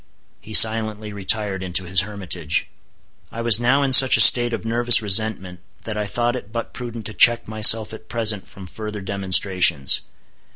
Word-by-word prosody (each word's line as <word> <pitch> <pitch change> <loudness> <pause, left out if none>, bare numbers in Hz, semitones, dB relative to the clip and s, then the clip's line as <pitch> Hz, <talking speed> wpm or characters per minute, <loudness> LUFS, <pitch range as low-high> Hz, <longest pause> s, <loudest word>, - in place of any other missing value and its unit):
He 110 - -3
silently 110 -1 +2
retired 100 -1 -2
into 95 0 -3
his 90 0 0
hermitage. 95 -6 -5 0.7
I 115 - -8
was 115 -2 +3
now 130 +4 0
in 135 -1 -2
such 130 0 +6
a - - -4
state 120 -1 +5
of 115 - -7
nervous 120 +1 +2
resentment 100 -3 -2 0.2
that 110 - -8
I 105 -1 -5
thought 120 +3 -3
it 110 -5 -11
but 115 0 -8
prudent 120 -3 -10
to 110 - -7
check 120 +2 +2
myself 110 0 +4
at 110 - -14
present 110 -4 -2
from 95 - -14
further 105 +2 -10
demonstrations. 95 -6 0
110 Hz, 170 wpm, -18 LUFS, 95-115 Hz, 0.7 s, such